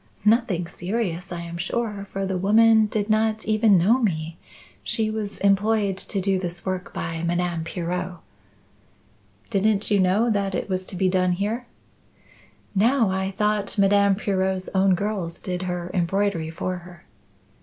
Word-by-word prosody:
Nothing 210 Hz, -6 st, +3 dB
serious 180 Hz, 0 st, -3 dB
I 175 Hz, -1 st, -4 dB
am 170 Hz, 0 st, -7 dB
sure, 205 Hz, +1 st, -3 dB
for 195 Hz, 0 st, -3 dB
the 190 Hz, -1 st, -2 dB
woman 220 Hz, +3 st, +5 dB
did 210 Hz, -1 st, -2 dB
not 220 Hz, 0 st, +1 dB
even 215 Hz, -2 st, +4 dB
know 210 Hz, +9 st, +4 dB
me. 165 Hz, -7 st, -2 dB, 0.4 s
She 220 Hz, -1 st, -1 dB
was 215 Hz, -2 st, -4 dB
employed 200 Hz, 0 st, +2 dB
to 200 Hz, -, -3 dB
do 190 Hz, 0 st, +1 dB
this 175 Hz, -1 st, -5 dB
work 185 Hz, -1 st, -3 dB
by 165 Hz, -1 st, -4 dB
Madame 170 Hz, -1 st, -1 dB
Pirot." 180 Hz, +1 st, -4 dB, 1.3 s
"Didn't 205 Hz, +1 st, +1 dB
you 205 Hz, -, +4 dB
know 195 Hz, +6 st, +3 dB
that 200 Hz, -2 st, 0 dB
it -, -, -2 dB
was 185 Hz, 0 st, -2 dB
to -, -, -7 dB
be 185 Hz, +1 st, +1 dB
done 185 Hz, -1 st, +2 dB
here?" 215 Hz, +6 st, -2 dB, 1.1 s
"No. 225 Hz, +1 st, +3 dB
I 190 Hz, 0 st, -2 dB
thought 210 Hz, -1 st, 0 dB
Madame 200 Hz, 0 st, +4 dB
Pirot's 190 Hz, -2 st, -1 dB
own 190 Hz, -1 st, +4 dB
girls 190 Hz, -3 st, -3 dB
did 180 Hz, -1 st, -4 dB
her 175 Hz, 0 st, -4 dB
embroidery 180 Hz, -2 st, 0 dB
for 180 Hz, +3 st, -3 dB
her." 175 Hz, 0 st, -14 dB
195 Hz, 155 wpm, -24 LUFS, 180-210 Hz, 1.3 s, woman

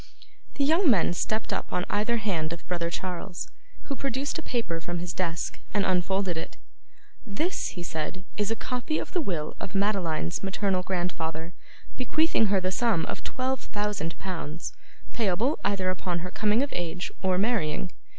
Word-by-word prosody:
The 285 Hz, -, +2 dB
young 320 Hz, +4 st, +5 dB
men 185 Hz, -7 st, +5 dB
stepped 215 Hz, +5 st, 0 dB
up -, -, -2 dB
on 180 Hz, 0 st, +1 dB
either 215 Hz, +3 st, +2 dB
hand 175 Hz, -8 st, 0 dB
of 170 Hz, -, -9 dB
brother 170 Hz, -2 st, 0 dB
Charles, 180 Hz, +1 st, -4 dB, 0.3 s
who 280 Hz, -, -3 dB
produced 275 Hz, +3 st, -1 dB
a -, -, -3 dB
paper 230 Hz, -, -1 dB
from 175 Hz, +1 st, -2 dB
his 175 Hz, 0 st, -3 dB
desk, 170 Hz, -3 st, -1 dB, 0.2 s
and 205 Hz, -, +4 dB
unfolded 185 Hz, 0 st, +2 dB
it. 160 Hz, -, -5 dB, 0.7 s
'This,' 285 Hz, -, 0 dB
he 175 Hz, -, -2 dB
said, 170 Hz, +3 st, -3 dB
'is 210 Hz, 0 st, +1 dB
a 225 Hz, -, +2 dB
copy 250 Hz, +7 st, -1 dB
of -, -, -3 dB
the 355 Hz, -, +3 dB
will 170 Hz, -, -2 dB
of 195 Hz, -, -5 dB
Madeline's 185 Hz, -, +1 dB
maternal 195 Hz, -1 st, +1 dB
grandfather, 175 Hz, -3 st, -2 dB, 0.4 s
bequeathing 265 Hz, -2 st, +3 dB
her 195 Hz, -1 st, +4 dB
the 185 Hz, 0 st, 0 dB
sum 220 Hz, -5 st, +3 dB
of -, -, -4 dB
twelve 260 Hz, 0 st, 0 dB
thousand 205 Hz, -8 st, -2 dB
pounds, 165 Hz, -, -4 dB, 0.4 s
payable 225 Hz, -, +2 dB
either 190 Hz, -2 st, +2 dB
upon 180 Hz, -1 st, -1 dB
her 180 Hz, -, -5 dB
coming 215 Hz, +4 st, +3 dB
of 285 Hz, -, -3 dB
age 175 Hz, +1 st, -2 dB
or 185 Hz, -1 st, +3 dB
marrying. 190 Hz, -5 st, +1 dB
190 Hz, 170 wpm, -28 LUFS, 175-225 Hz, 0.7 s, young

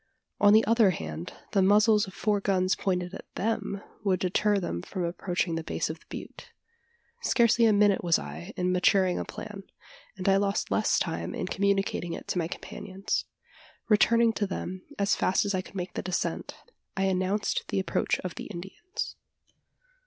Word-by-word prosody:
On 205 Hz, -, +6 dB
the 220 Hz, +1 st, +6 dB
other 225 Hz, -2 st, +5 dB
hand, 80 Hz, -, -5 dB, 0.2 s
the 200 Hz, -, +3 dB
muzzles 210 Hz, +2 st, +5 dB
of 190 Hz, -, -11 dB
four 210 Hz, -1 st, +1 dB
guns 185 Hz, -2 st, +2 dB
pointed 180 Hz, -1 st, -1 dB
at -, -, -10 dB
them, 205 Hz, -1 st, -2 dB, 0.2 s
would 190 Hz, -3 st, +2 dB
deter 205 Hz, +3 st, +2 dB
them 175 Hz, -, -2 dB
from 185 Hz, -, -4 dB
approaching 175 Hz, 0 st, -1 dB
the 165 Hz, 0 st, -2 dB
base 160 Hz, -, -2 dB
of 160 Hz, -, -9 dB
the -, -, -25 dB
butte. -, -, -9 dB, 0.7 s
Scarcely 235 Hz, -, +4 dB
a -, -, +5 dB
minute 205 Hz, -2 st, +4 dB
was 170 Hz, -2 st, +4 dB
I 75 Hz, +4 st, -7 dB
in 180 Hz, 0 st, +1 dB
maturing 185 Hz, 0 st, +3 dB
a -, -, -3 dB
plan; 210 Hz, -2 st, -8 dB, 0.6 s
and 185 Hz, -, -4 dB
I 195 Hz, 0 st, +5 dB
lost 200 Hz, 0 st, 0 dB
less -, -, +2 dB
time -, -, -2 dB
in -, -, -2 dB
communicating 195 Hz, -3 st, 0 dB
it -, -, -7 dB
to 180 Hz, -, 0 dB
my 165 Hz, -, 0 dB
companions. 190 Hz, +2 st, -4 dB, 0.6 s
Returning 230 Hz, +2 st, +5 dB
to 205 Hz, -2 st, -1 dB
them, 185 Hz, -1 st, -5 dB, 0.2 s
as 200 Hz, 0 st, +2 dB
fast 190 Hz, -, +2 dB
as 200 Hz, -, 0 dB
I 185 Hz, -, 0 dB
could 190 Hz, -, -15 dB
make 180 Hz, -1 st, -4 dB
the -, -, -3 dB
descent, 185 Hz, 0 st, -2 dB, 0.4 s
I 195 Hz, -, +1 dB
announced 190 Hz, +2 st, 0 dB
the -, -, 0 dB
approach 190 Hz, -, 0 dB
of 180 Hz, -2 st, -5 dB
the -, -, -7 dB
Indians. 195 Hz, -, -6 dB
195 Hz, 180 wpm, -28 LUFS, 180-205 Hz, 0.7 s, On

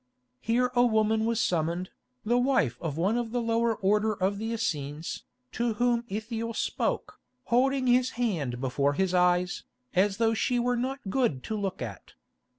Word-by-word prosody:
Here 245 Hz, +2 st, +1 dB
a 245 Hz, -1 st, +4 dB
woman 220 Hz, -1 st, +2 dB
was 230 Hz, -1 st, 0 dB
summoned, 175 Hz, -3 st, 0 dB, 0.3 s
the 240 Hz, +3 st, +3 dB
wife 245 Hz, -, +2 dB
of 160 Hz, -3 st, -3 dB
one 195 Hz, +8 st, +1 dB
of 235 Hz, -2 st, -3 dB
the 245 Hz, +2 st, -1 dB
lower 230 Hz, 0 st, +1 dB
order 210 Hz, +2 st, +2 dB
of 195 Hz, +1 st, -1 dB
the 225 Hz, +1 st, -3 dB
Essenes, 155 Hz, -8 st, -3 dB, 0.3 s
to 235 Hz, -1 st, -1 dB
whom 240 Hz, +1 st, +1 dB
Ithiel 225 Hz, +2 st, -4 dB
spoke, -, -, -2 dB, 0.2 s
holding 260 Hz, +2 st, +2 dB
his 250 Hz, +1 st, +4 dB
hand 160 Hz, -, -1 dB
before 140 Hz, +2 st, +1 dB
his 190 Hz, +3 st, 0 dB
eyes, 180 Hz, 0 st, +2 dB, 0.3 s
as 195 Hz, +2 st, +2 dB
though 225 Hz, 0 st, +2 dB
she 245 Hz, +2 st, 0 dB
were 245 Hz, +1 st, +1 dB
not 265 Hz, +3 st, -2 dB
good 185 Hz, -, +1 dB
to 220 Hz, -, -3 dB
look 195 Hz, -7 st, -3 dB
at. 105 Hz, -8 st, -9 dB
220 Hz, 165 wpm, -28 LUFS, 180-240 Hz, 0.3 s, a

